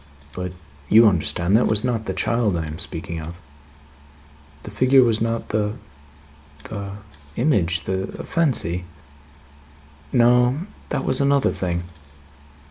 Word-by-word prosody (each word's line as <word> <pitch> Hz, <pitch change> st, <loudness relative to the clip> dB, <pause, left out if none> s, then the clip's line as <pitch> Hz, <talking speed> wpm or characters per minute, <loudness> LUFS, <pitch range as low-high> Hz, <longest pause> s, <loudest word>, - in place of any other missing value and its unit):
But, 90 Hz, -1 st, -5 dB, 0.4 s
you 115 Hz, +2 st, +7 dB
understand 85 Hz, +1 st, +1 dB
that -, -, +6 dB
that -, -, +2 dB
was 110 Hz, 0 st, +1 dB
not 120 Hz, -3 st, -1 dB
the -, -, -3 dB
child 115 Hz, -6 st, 0 dB
I 80 Hz, -, -3 dB
am 75 Hz, +1 st, -7 dB
speaking 85 Hz, -1 st, -6 dB
of?" 80 Hz, +2 st, -8 dB, 1.3 s
"The 105 Hz, -, -9 dB
figure 130 Hz, +5 st, +5 dB
was 115 Hz, -2 st, +1 dB
not; 115 Hz, 0 st, -2 dB
the 105 Hz, -1 st, 0 dB, 0.9 s
the 100 Hz, -2 st, -6 dB, 0.4 s
image; 95 Hz, -, +1 dB
the 95 Hz, 0 st, -3 dB, 0.2 s
fancy?" 115 Hz, -, +1 dB, 1.3 s
"No. 125 Hz, +3 st, +4 dB, 0.3 s
That 135 Hz, -, -2 dB
was 130 Hz, -, +3 dB
another 140 Hz, 0 st, +3 dB
thing. 85 Hz, -1 st, -3 dB
105 Hz, 130 wpm, -22 LUFS, 90-125 Hz, 1.3 s, you